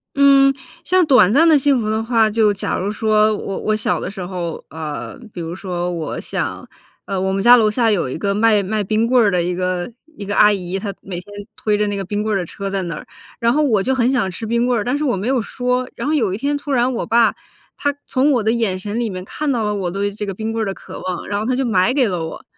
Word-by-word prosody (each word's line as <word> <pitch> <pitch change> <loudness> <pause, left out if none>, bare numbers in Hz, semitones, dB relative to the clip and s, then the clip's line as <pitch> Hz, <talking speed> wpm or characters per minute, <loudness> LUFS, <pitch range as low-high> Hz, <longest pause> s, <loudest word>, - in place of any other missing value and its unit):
嗯， 275 -1 +6 0.3
像 370 0 +3
短 250 -9 +5
暂 320 +7 +5
的 315 - +6
幸 275 -2 +3
福 215 - -2
的 220 +1 0
话， 225 -1 +3
就 215 -1 +3
假 200 - -2
如 195 +2 -2
说 215 0 +2
我 195 - -5
我 215 0 0
小 215 - 0
的 - - -4
时 200 -1 -9
候， 175 -2 -5
呃， 155 -2 -6 0.2
比 175 - -7
如 165 0 -5
说 180 -2 -4
我 165 -3 -4
想 - - -4 0.4
呃， 195 -2 -3
我 190 0 0
们 195 - -1
家 240 +4 +8
楼 215 -2 +3
下 225 0 +2
有 180 -10 0
一 130 - -4
个 200 +3 -1
卖 215 0 +4
卖 210 +2 -1
冰 215 +3 +1
棍 250 0 +4
儿 210 - +3
的 180 -2 +1
一 175 +1 -1
个 180 0 -2 0.3
一 205 - -6
个 205 - -2
阿 210 0 +6
姨， 190 -1 -3
她 200 0 -4
每 180 -3 -6
天 205 +3 -15 0.2
推 210 -1 0
着 210 - +1
那 205 0 -2
个 195 - -3
冰 205 +3 -3
棍 215 -1 0
儿 - - +1
的 - - -3
车 195 +4 -6
在 195 -1 -2
那 170 -3 -4
儿。 - - -9 0.3
然 235 0 +2
后 300 +4 +2
我 230 -9 +2
就 265 +7 0
很 250 -1 +2
想 250 -7 +1
吃 185 +5 -6
冰 235 +2 +1
棍 245 -3 +1
儿， - - -3
但 255 +4 0
是 305 - -2
我 250 -7 +1
没 200 +5 -3
有 260 -1 +2
说。 250 +3 -2
然 235 - -4
后 - - +1
有 225 -11 +1
一 - - -2
天 285 +6 -1
突 285 0 -5
然 250 0 +2
我 235 - -3
爸 230 -1 +4 0.4
他 285 0 -1
从 275 +3 +2
我 245 -4 +1
的 220 - +1
眼 225 -5 0
神 205 +4 -4
里 240 -1 -1
面 185 -1 -6
看 300 +9 -3
到 235 -3 0
了 210 -1 0
我 195 -3 -2
对 200 +2 -1
这 205 +1 -6
个 195 - -4
冰 220 +3 -4
棍 225 0 -2
儿 - - -5
的 195 - -3
渴 - - -10
望， 185 -1 -5
然 205 - -1
后 215 - -3
他 255 - +1
就 265 +1 0
买 220 +1 +2
给 260 -5 +3
了 175 -4 -2
我。 - - -9
215 Hz, 305 characters per minute, -19 LUFS, 195-245 Hz, 0.4 s, 家